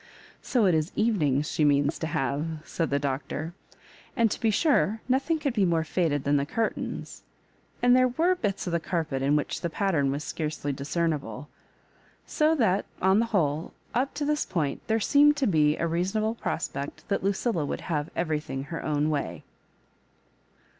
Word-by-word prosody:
" -, -, -27 dB
So 240 Hz, -5 st, +4 dB
it 185 Hz, -, +4 dB
is 155 Hz, +1 st, +1 dB
Kyenings 150 Hz, -, +2 dB
she 155 Hz, -, 0 dB
means 145 Hz, +1 st, +2 dB
to 160 Hz, -, -2 dB
have 145 Hz, -3 st, -1 dB
I" -, -, -2 dB, 0.2 s
said 165 Hz, -3 st, -2 dB
the 140 Hz, -, +1 dB
Doctor; 145 Hz, +4 st, -3 dB, 0.6 s
an(Ji 230 Hz, -2 st, +4 dB
to -, -, -3 dB
be 225 Hz, -, +3 dB
sure, 225 Hz, -, +2 dB
nothing 270 Hz, +6 st, +1 dB
could 285 Hz, -4 st, -1 dB
be 210 Hz, -4 st, +2 dB
more 170 Hz, -3 st, +2 dB
faded 155 Hz, -4 st, 0 dB
than 145 Hz, +1 st, +2 dB
the.curtains, 180 Hz, +11 st, -3 dB, 0.6 s
and 245 Hz, 0 st, +6 dB
there 255 Hz, 0 st, +5 dB
were 325 Hz, +9 st, +2 dB
bits 205 Hz, -, -2 dB
of 175 Hz, -, -3 dB
the 170 Hz, -, +2 dB
carpet 160 Hz, -6 st, -2 dB
in 140 Hz, +2 st, +2 dB
which 150 Hz, -, -1 dB
the 170 Hz, -, -1 dB
pattern 160 Hz, -6 st, +1 dB
was 140 Hz, +2 st, -2 dB
scarcely 150 Hz, -3 st, -3 dB
discernible. 145 Hz, -3 st, -2 dB, 0.8 s
So 315 Hz, +1 st, +2 dB
|hat, 200 Hz, -6 st, +2 dB
on 190 Hz, +2 st, +4 dB
the 230 Hz, -, +1 dB
whole, 160 Hz, -7 st, 0 dB, 0.2 s
up 260 Hz, +4 st, 0 dB
to 290 Hz, 0 st, -2 dB
this 300 Hz, +1 st, +1 dB
point 155 Hz, -7 st, -2 dB
there 220 Hz, -, +2 dB
seem]s4 290 Hz, +6 st, +5 dB
to 285 Hz, -2 st, 0 dB
be 155 Hz, -6 st, +3 dB
a -, -, 0 dB
reasonable 190 Hz, +7 st, 0 dB
prospect 140 Hz, -10 st, -4 dB
that 200 Hz, -, 0 dB
Lucilla 195 Hz, -2 st, 0 dB
would 145 Hz, -, -3 dB
have 150 Hz, -3 st, -2 dB
everything 150 Hz, -5 st, -2 dB
ber 165 Hz, -, -3 dB
own 150 Hz, 0 st, 0 dB
way. 145 Hz, -2 st, -3 dB
170 Hz, 180 wpm, -27 LUFS, 145-225 Hz, 0.8 s, and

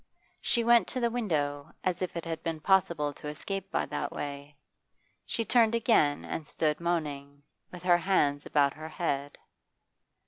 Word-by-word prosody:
She 240 Hz, -3 st, +2 dB
went 235 Hz, -3 st, +5 dB
to 255 Hz, -, -3 dB
the 235 Hz, -1 st, +1 dB
window, 155 Hz, -10 st, -1 dB
as 185 Hz, 0 st, -1 dB
if 180 Hz, -2 st, -3 dB
it 170 Hz, -, -5 dB
had 165 Hz, -1 st, -4 dB
been 165 Hz, -2 st, -3 dB
possible 165 Hz, -5 st, +2 dB
to 150 Hz, -, -9 dB
escape 195 Hz, +6 st, -5 dB
by -, -, 0 dB
that 145 Hz, -, -3 dB
way; 145 Hz, 0 st, -6 dB, 0.7 s
she 230 Hz, -, -1 dB
turned 230 Hz, -1 st, +4 dB
again 220 Hz, -, +3 dB
and 155 Hz, -, -5 dB
stood 150 Hz, -1 st, 0 dB
moaning, 145 Hz, -4 st, -3 dB, 0.3 s
with 180 Hz, -1 st, -10 dB
her 175 Hz, -1 st, +5 dB
hands 145 Hz, -6 st, +2 dB
about 140 Hz, -2 st, +2 dB
her 155 Hz, +1 st, -8 dB
head. 145 Hz, -4 st, -2 dB
165 Hz, 165 wpm, -29 LUFS, 145-195 Hz, 0.7 s, went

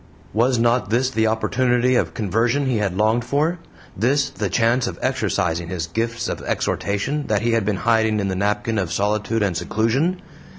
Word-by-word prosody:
Was 120 Hz, +3 st, +2 dB
not 120 Hz, -3 st, +2 dB
this 125 Hz, +4 st, +1 dB
the 110 Hz, -3 st, +1 dB
opportunity 125 Hz, +2 st, +1 dB
of 125 Hz, -, 0 dB
conversion 115 Hz, +6 st, +1 dB
he 130 Hz, -3 st, +1 dB
had 100 Hz, -3 st, -1 dB
longed 110 Hz, +3 st, +2 dB
for 150 Hz, +8 st, 0 dB, 0.4 s
this 135 Hz, +8 st, +1 dB
the 105 Hz, -3 st, -3 dB
chance 115 Hz, +6 st, +2 dB
of -, -, -5 dB
exercising 100 Hz, -10 st, -1 dB
his 85 Hz, -2 st, -3 dB
gifts 115 Hz, +6 st, -2 dB
of -, -, -4 dB
exhortation 135 Hz, +9 st, -2 dB
that 105 Hz, 0 st, 0 dB
he 120 Hz, -, +2 dB
had 115 Hz, -3 st, +1 dB
been 105 Hz, -2 st, 0 dB
hiding 110 Hz, -2 st, +3 dB
in 100 Hz, -, -1 dB
the 95 Hz, -, -2 dB
napkin 105 Hz, +3 st, 0 dB
of 90 Hz, -3 st, -2 dB
solitude 105 Hz, +2 st, 0 dB
and 95 Hz, -4 st, 0 dB
seclusion? 115 Hz, -, 0 dB
115 Hz, 180 wpm, -21 LUFS, 100-125 Hz, 0.4 s, hiding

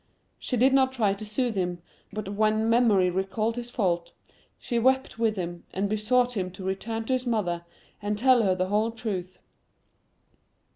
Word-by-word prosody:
—She 250 Hz, -, -2 dB
did 260 Hz, +3 st, +4 dB
not 265 Hz, -1 st, +4 dB
try 220 Hz, -6 st, +1 dB
to 200 Hz, +2 st, -7 dB
soothe 220 Hz, +2 st, -1 dB
him; 180 Hz, -2 st, -1 dB, 0.3 s
but 210 Hz, -1 st, -5 dB
when 215 Hz, +1 st, +2 dB
Memory 220 Hz, -6 st, +4 dB
recalled 205 Hz, +5 st, -1 dB
his 240 Hz, 0 st, -5 dB
fault, 175 Hz, -8 st, -1 dB, 0.4 s
she 240 Hz, -2 st, -2 dB
wept 260 Hz, 0 st, +1 dB
with 225 Hz, -2 st, +2 dB
him, 175 Hz, -2 st, -5 dB
and 195 Hz, +2 st, 0 dB
besought 240 Hz, +4 st, +1 dB
him 185 Hz, -3 st, -1 dB
to 190 Hz, -, -9 dB
return 225 Hz, +4 st, -3 dB
to 260 Hz, -, 0 dB
his 255 Hz, 0 st, -1 dB
mother, 180 Hz, -7 st, 0 dB, 0.4 s
and 205 Hz, 0 st, -1 dB
tell 250 Hz, +1 st, +5 dB
her 190 Hz, -4 st, +2 dB
the 185 Hz, 0 st, -1 dB
whole 210 Hz, +2 st, +2 dB
truth. 195 Hz, -6 st, -5 dB
215 Hz, 175 wpm, -27 LUFS, 190-240 Hz, 0.4 s, tell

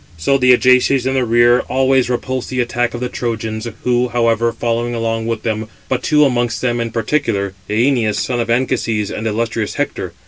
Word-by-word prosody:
So 135 Hz, +13 st, +1 dB
the 125 Hz, 0 st, +5 dB
Ajaces 125 Hz, +1 st, +4 dB
in 130 Hz, -, 0 dB
the 130 Hz, -1 st, +1 dB
rear 120 Hz, +1 st, +4 dB
always 130 Hz, -1 st, +2 dB
repulsed 130 Hz, +1 st, -3 dB
the 130 Hz, -, -3 dB
attack 120 Hz, 0 st, -1 dB
of 120 Hz, -, -6 dB
the 125 Hz, -, -1 dB
Trojans, 110 Hz, -2 st, -4 dB, 0.2 s
who, 125 Hz, 0 st, +2 dB
however, 115 Hz, -1 st, +1 dB
followed 120 Hz, +1 st, -2 dB
along 115 Hz, -1 st, -2 dB
with 115 Hz, -1 st, -3 dB
them; 110 Hz, -1 st, -2 dB, 0.2 s
but 130 Hz, -, 0 dB
two 150 Hz, -1 st, +3 dB
amongst 120 Hz, -3 st, 0 dB
them 120 Hz, -2 st, -1 dB
in 115 Hz, -, -2 dB
particular, 110 Hz, -4 st, -1 dB, 0.2 s
Æneas, 115 Hz, -1 st, +1 dB
son 125 Hz, -2 st, -1 dB
of 115 Hz, -1 st, -2 dB
Anchises, 115 Hz, -4 st, 0 dB
and 110 Hz, -, -4 dB
illustrious 115 Hz, 0 st, -2 dB
Hector. -, -, -3 dB
120 Hz, 185 wpm, -17 LUFS, 115-125 Hz, 0.2 s, the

